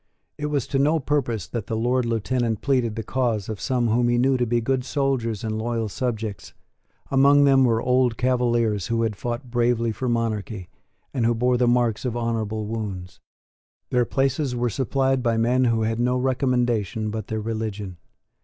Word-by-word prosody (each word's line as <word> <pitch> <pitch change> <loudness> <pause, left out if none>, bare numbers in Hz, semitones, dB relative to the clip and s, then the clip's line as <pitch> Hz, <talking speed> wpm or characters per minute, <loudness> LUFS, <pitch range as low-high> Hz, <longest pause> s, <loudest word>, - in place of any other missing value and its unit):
It 150 0 -3
was 145 -4 -1
to 135 - 0
no 150 +4 +3
purpose 125 - -1
that 110 +4 -5
the 110 - -2
Lord 125 +2 +1
Lieutenant 115 -1 -1
pleaded 125 -5 +1
the 115 - -4
cause 115 -4 -1
of 110 -2 -5
some 125 -3 0
whom 120 +2 +2
he 120 - +2
knew 130 +2 +3
to 125 -1 0
be 120 +1 +1
good 130 +2 0
soldiers 130 -6 -1
and 110 -1 -2
loyal 115 -1 -2
subjects. 110 -4 -4 0.6
Among 140 +1 +5
them 135 -2 +5
were 115 -2 +2
old 125 -2 +2
Cavaliers, 120 -5 +1
who 115 0 0
had 110 -2 -1
fought 120 +3 -5
bravely 120 -1 +1
for 125 +3 -3
monarchy, 110 -5 -2 0.4
and 125 - 0
who 115 +1 +2
bore 125 +2 +2
the 125 0 +2
marks 120 -2 +2
of 120 -2 -2
honourable 110 -2 -2
wounds. 100 -5 -5 0.7
Their 125 -1 +3
places 135 +1 0
were 120 -1 0
supplied 135 +2 0
by 115 -2 +1
men 125 +3 +2
who 115 -2 +2
had 115 +1 -1
no 125 +1 +1
recommendation 120 -5 0
but 110 -1 -5
their 110 - -2
religion. 105 -4 -4
120 Hz, 180 wpm, -24 LUFS, 110-130 Hz, 0.7 s, Among